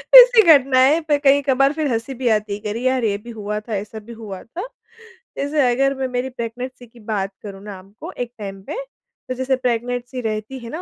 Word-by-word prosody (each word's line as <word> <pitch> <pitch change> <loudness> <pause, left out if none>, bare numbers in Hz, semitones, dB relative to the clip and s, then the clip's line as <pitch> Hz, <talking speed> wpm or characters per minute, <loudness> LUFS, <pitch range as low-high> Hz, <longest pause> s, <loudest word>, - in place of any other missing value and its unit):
ऐसी - - +10
घटनाएँ 275 +2 +4
पे 295 -1 +3
कई 280 0 +4
कभार 275 +2 +4
फ़िर 310 -1 -1
हँसी 230 +4 -3
भी 250 0 -3
आती 210 -2 +1
है 205 - -4
कि 210 - -5
अरे 215 +3 -3
यार 255 -1 +1
ये 200 -2 +1
भी 235 +3 -13
हुआ 210 -1 -4
था, 215 0 -5
ऐसा 210 +2 -5
भी 230 +3 -11
हुआ 210 -4 -8
था। 365 - -7 0.7
जैसे 285 -2 +2
अगर 275 +2 +2
मैं 265 0 -2
मेरी 250 +1 -2
प्रेगनेंसी 245 +1 -6
की 235 +1 -19
बात 205 -3 -2
करूँ 195 -1 -9
ना 205 -2 -7
आपको 195 +3 -11
एक 245 -1 -5
टाइम 195 -2 -6
पे - - -3 0.5
तो - - 0
जैसे 260 +1 0
प्रेगनेंसी 245 0 -2
रहती 220 +3 -4
है 235 - -9
ना 320 +8 -5
245 Hz, 220 wpm, -21 LUFS, 215-265 Hz, 0.7 s, ऐसी